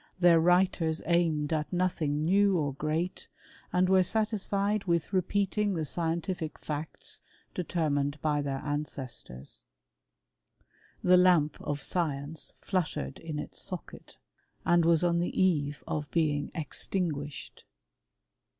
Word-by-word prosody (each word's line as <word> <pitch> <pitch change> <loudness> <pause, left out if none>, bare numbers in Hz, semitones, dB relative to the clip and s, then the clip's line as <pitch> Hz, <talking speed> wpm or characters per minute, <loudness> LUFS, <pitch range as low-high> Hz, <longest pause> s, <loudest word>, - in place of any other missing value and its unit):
Their 175 -2 +6
writers 175 -2 +2
aimed 165 -3 +2
at 150 -2 -1
nothing 160 -5 0
new 195 +2 +4
or 145 -4 0
great, 155 +5 -2 0.4
and 180 +1 +3
were 190 0 +5
satisfied 205 0 0
with 170 +1 0
repeating 200 +2 +1
the 160 -2 -1
scientific 165 +1 -2
fticts 150 +1 -5 0.3
determined 150 -5 -1
by 150 -1 +1
their 135 -1 -3
ancestors. 130 - -5 1.4
The 180 0 +6
lamp 175 -5 +4
of 145 -1 -3
science 155 -3 -3
fluttered 165 - -2
in 160 -2 -5
its 150 - -5
socket, 180 -4 -7 0.5
and 175 -1 +4
was 165 0 +4
on 170 -1 +2
the 175 - -1
eve 150 -7 +1
of 150 -1 -3
^ing 150 -3 +1
extinguished. 150 -2 -3
165 Hz, 115 wpm, -29 LUFS, 150-180 Hz, 1.4 s, Their